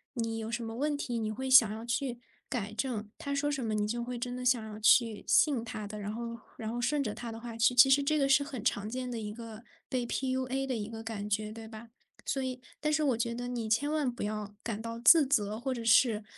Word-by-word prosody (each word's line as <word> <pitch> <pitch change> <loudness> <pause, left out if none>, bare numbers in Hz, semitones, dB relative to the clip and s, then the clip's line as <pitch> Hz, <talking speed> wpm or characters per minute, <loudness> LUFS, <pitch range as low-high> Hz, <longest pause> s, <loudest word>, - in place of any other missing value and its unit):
你 225 -1 -2
有 220 0 -4
什 235 0 -3
么 225 0 -6
问 290 +3 0
题， 240 -4 -3
你 215 -1 -2
会 265 +4 -4
想 245 -5 +7
要 220 +2 -6
去 245 0 -2 0.3
改 215 -5 -3
正， 220 -2 -2
他 280 -1 -3
说 290 +1 0
什 270 -3 -2
么 215 -1 -1
你 210 0 0
就 235 +2 -2
会 245 0 -5
真 245 +1 -4
的 250 - -5
想 245 -3 +3
要 210 - -8
去 225 0 +4
信 270 -7 +4
他 215 -2 -6
的， 210 +1 -7
然 205 +1 -4
后 235 +1 -5 0.2
然 220 -1 -4
后 240 +1 -3
顺 285 +3 +1
着 210 -3 -3
他 235 -1 -6
的 225 - -7
话 235 -1 -7
去 230 +2 +3
其 265 +2 +8
实 280 +1 +6
这 305 +2 +1
个 275 -1 +2
是 275 +1 +5
很 260 -6 -6
常 210 -3 0
见 255 +1 -4
的 230 - -3
一 210 -1 -5
个 225 0 -9 0.2
被 245 -2 -2
PUA 260 +1 -1
的 260 -2 -2
一 215 0 -4
个 225 0 -7
感 210 -2 -5
觉， 210 +1 -1
对 225 0 -9
吧？ 225 +1 -11 0.3
所 270 - -1
以 255 -1 -4 0.2
但 300 0 0
是 310 - +2
我 265 -6 +2
觉 235 0 -1
得 245 +1 -4
你 235 -3 -3
千 280 +7 +1
万 300 -4 +1
不 240 - -7
要 210 -1 -4
感 220 -2 -3
到 230 +1 -5
自 290 +5 +7
责， 215 -5 0
或 265 +1 -2
者 235 -2 -5
是 225 -1 +4
235 Hz, 290 characters per minute, -31 LUFS, 220-260 Hz, 0.3 s, 其